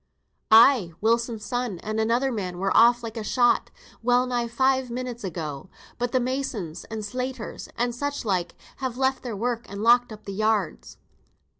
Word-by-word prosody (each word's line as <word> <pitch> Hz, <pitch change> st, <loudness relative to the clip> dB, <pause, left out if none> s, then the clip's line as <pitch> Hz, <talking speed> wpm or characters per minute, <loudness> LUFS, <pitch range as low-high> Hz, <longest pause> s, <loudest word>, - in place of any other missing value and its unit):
"Ay, 220 Hz, -5 st, +6 dB
Wilson's 230 Hz, 0 st, 0 dB
son 245 Hz, -5 st, -2 dB
and 215 Hz, +1 st, -2 dB
another 235 Hz, +4 st, +1 dB
man 185 Hz, -6 st, -4 dB
were 195 Hz, +2 st, 0 dB
off 240 Hz, +1 st, +6 dB
like 230 Hz, 0 st, -6 dB
a 220 Hz, -, -3 dB
shot, 240 Hz, +3 st, +2 dB, 0.3 s
well 245 Hz, +2 st, +3 dB
nigh 245 Hz, -2 st, -1 dB
five 260 Hz, +2 st, +1 dB
minute 245 Hz, -1 st, -5 dB
agone. 160 Hz, -4 st, -5 dB, 0.3 s
But 245 Hz, 0 st, -1 dB
th' 255 Hz, -, +2 dB
masons, 245 Hz, -, -3 dB
and 220 Hz, -1 st, -5 dB
slaters, 250 Hz, +1 st, -5 dB
and 240 Hz, 0 st, 0 dB
such 285 Hz, +1 st, -3 dB
like, 185 Hz, -4 st, -1 dB, 0.2 s
have 260 Hz, -3 st, -4 dB
left 265 Hz, 0 st, +1 dB
their 235 Hz, -5 st, -5 dB
work, 240 Hz, +2 st, -2 dB
and 200 Hz, +2 st, -5 dB
locked 240 Hz, +1 st, +5 dB
up 215 Hz, 0 st, -10 dB
the 200 Hz, -, -5 dB
yards." 215 Hz, -2 st, -1 dB
235 Hz, 170 wpm, -25 LUFS, 210-250 Hz, 0.3 s, Ay